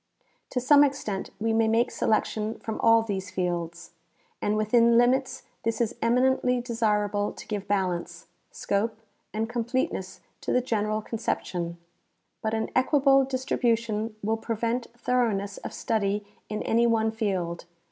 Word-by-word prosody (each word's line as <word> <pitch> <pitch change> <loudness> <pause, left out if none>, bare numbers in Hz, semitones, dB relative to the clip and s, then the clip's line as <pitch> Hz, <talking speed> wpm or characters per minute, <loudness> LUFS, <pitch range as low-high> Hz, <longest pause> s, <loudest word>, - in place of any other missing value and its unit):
To 250 - -1
some 285 +3 +6
extent 265 -9 -2
we 225 +1 0
may 225 0 +3
make 230 +3 +2
selection 220 0 0
from 220 - -5
all 225 0 +5
these 195 -3 -4
fields, 170 -2 -3 0.5
and 210 +1 +1
within 230 +2 +4
limits 255 +2 +2 0.2
this 230 0 -1
is 235 -1 +1
eminently 250 +1 +2
desirable 210 -4 0
to - - -10
give 205 -2 -4
balance, 180 -3 -1 0.2
scope 215 +2 -1 0.3
and 220 +1 -1
completeness 240 -5 -2 0.2
to - - -2
the - - +4
general 215 -3 -1
conception; 175 -7 -3 0.6
but 220 0 -1
an 220 - -2
equable 270 +1 +4
distribution 230 -4 -1
will 220 +2 +1
prevent 230 +2 -2
thoroughness 220 -6 0
of - - -7
study 205 -2 -1 0.2
in 210 - -3
any 235 +1 +3
one 220 -1 +2
field. 190 -6 -2
225 Hz, 135 wpm, -27 LUFS, 205-240 Hz, 0.6 s, some